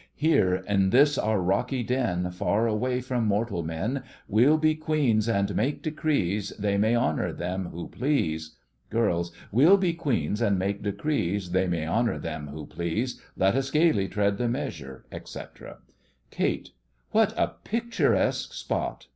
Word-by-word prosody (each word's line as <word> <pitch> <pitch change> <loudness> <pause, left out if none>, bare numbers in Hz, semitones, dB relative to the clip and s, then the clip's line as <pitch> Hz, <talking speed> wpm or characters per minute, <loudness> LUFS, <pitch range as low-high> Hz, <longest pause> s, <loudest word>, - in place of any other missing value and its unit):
Here, 95 - +2
in 100 -2 +2
this 145 +6 +5
our 110 -4 +1
rocky 120 +8 0
den, 110 -8 -1
Far 100 +5 0
away 125 +3 0
from 125 -3 -1
mortal 105 -3 0
men, 95 - -2 0.3
We'll 125 +9 +4
be 155 0 +3
queens, 145 -8 +1
and 100 -3 0
make 135 +7 -1
decrees— 105 - -1
They 100 -1 0
may 110 +3 +3
honour 120 - +1
them 90 +1 -3
who 85 +1 -7
please. 80 - -1 0.3
GIRLS: 85 -7 0 0.2
We'll 150 - +6
be 185 -3 +1
queens, 120 - -1
and 100 -4 +2
make 100 +2 -1
decrees— 100 - -1
They 95 +1 +2
may 85 -3 -1
honour 115 +7 +1
them 75 -1 -5
who 75 +1 -7
please. 85 - -3 0.2
Let 95 +1 +3
us 135 +1 0
gaily 150 - +3
tread 100 0 0
the 120 -1 +1
measure, 100 - -5
etc. - - -9 0.5
KATE: - - -1 0.4
What - - +3
a - - +1
picturesque 235 +1 0
spot! - - -3
105 Hz, 150 wpm, -27 LUFS, 95-135 Hz, 0.5 s, We'll